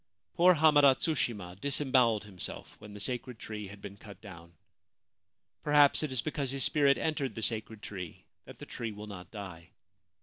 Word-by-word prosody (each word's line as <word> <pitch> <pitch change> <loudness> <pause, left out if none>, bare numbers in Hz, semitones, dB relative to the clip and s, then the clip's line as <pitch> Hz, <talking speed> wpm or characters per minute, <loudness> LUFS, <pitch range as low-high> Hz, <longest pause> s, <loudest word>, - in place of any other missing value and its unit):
Poor 180 +1 +6
Hamada 145 -3 +6
Tsushima 115 - -2
disembowelled 130 -6 +2
himself 95 -6 -6
when 105 0 -11
the - - -8
sacred 125 +2 -4
tree 105 -2 -6
had 100 +1 -12
been 100 0 -8
cut 100 -1 -12
down. 85 -5 -12 1.1
Perhaps 145 -1 +5
it 155 -3 -2
is 125 -3 0
because 145 -3 -2
his 135 0 -1
spirit 140 -1 +3
entered 150 -4 -2
the 110 - -5
sacred 110 0 -2
tree 90 -5 -7 0.2
that - - -12
the - - -9
tree 115 -2 -5
will 105 +1 -8
not 95 -4 -9
die. 90 -5 -9
115 Hz, 170 wpm, -31 LUFS, 100-140 Hz, 1.1 s, Poor